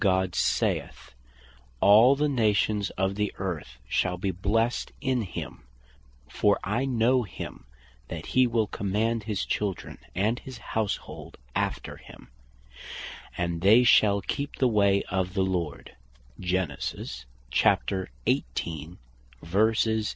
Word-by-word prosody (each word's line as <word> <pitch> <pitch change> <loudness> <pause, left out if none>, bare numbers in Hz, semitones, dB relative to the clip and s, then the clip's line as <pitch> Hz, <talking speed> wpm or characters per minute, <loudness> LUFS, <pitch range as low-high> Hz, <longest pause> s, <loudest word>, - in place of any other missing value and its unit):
God 95 -3 +2
saith, - - -1 0.7
"All 110 - +7
the 150 +2 +1
Nations 105 -5 +1
of 95 +1 +1
the 105 0 -1
Earth 80 -10 -4
shall 90 -1 0
be 95 +2 -1
blessed 110 +6 0
in 130 -2 0
him, 85 - -6 0.7
For 105 -1 +2
I 120 +7 0
know 125 0 +3
him 95 - -8 0.4
that - - -6
he 130 0 +5
will 115 -2 +1
command 105 +3 -1
his 105 -3 -2
children 100 -4 -3 0.2
and 105 +6 +1
his 130 -3 -9 0.2
houshold 110 -3 -3 0.2
after - - -2
him, - - -15 1.1
and 85 -1 -2
they 110 +6 +6
shall 100 -4 +5
keep 140 +8 -3
the 130 - +2
way 100 -3 +3
of 95 -1 -1
the 95 - +2
Lord." 90 -5 -3
105 Hz, 110 wpm, -27 LUFS, 95-115 Hz, 1.1 s, All